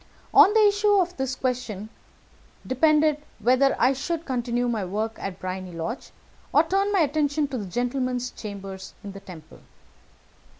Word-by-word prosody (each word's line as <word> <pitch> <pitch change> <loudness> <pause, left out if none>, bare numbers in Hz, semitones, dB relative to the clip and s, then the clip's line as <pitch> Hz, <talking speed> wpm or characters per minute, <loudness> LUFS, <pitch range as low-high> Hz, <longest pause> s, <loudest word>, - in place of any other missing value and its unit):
On 395 - +8
the 435 -1 +6
issue 410 0 +3
of 360 -1 0
this 265 -1 -2
question 240 -6 -3 0.8
depended 300 +2 +3 0.2
whether 255 +5 +3
I 255 +3 +4
should 320 +5 -3
continue 245 -2 -1
my 225 -4 -1
work 215 +4 -2
at 195 -2 -5
Briony 185 -1 -5
Lodge, 165 +9 -5 0.4
or 300 - +5
turn 390 +4 0
my 390 -3 +3
attention 295 0 +1
to 260 -3 -3
the 200 - -5
gentleman's 245 +3 -2
chambers 195 -2 -8
in 200 - -7
the 195 - -9
Temple. 175 -5 -13
250 Hz, 155 wpm, -25 LUFS, 205-300 Hz, 0.8 s, On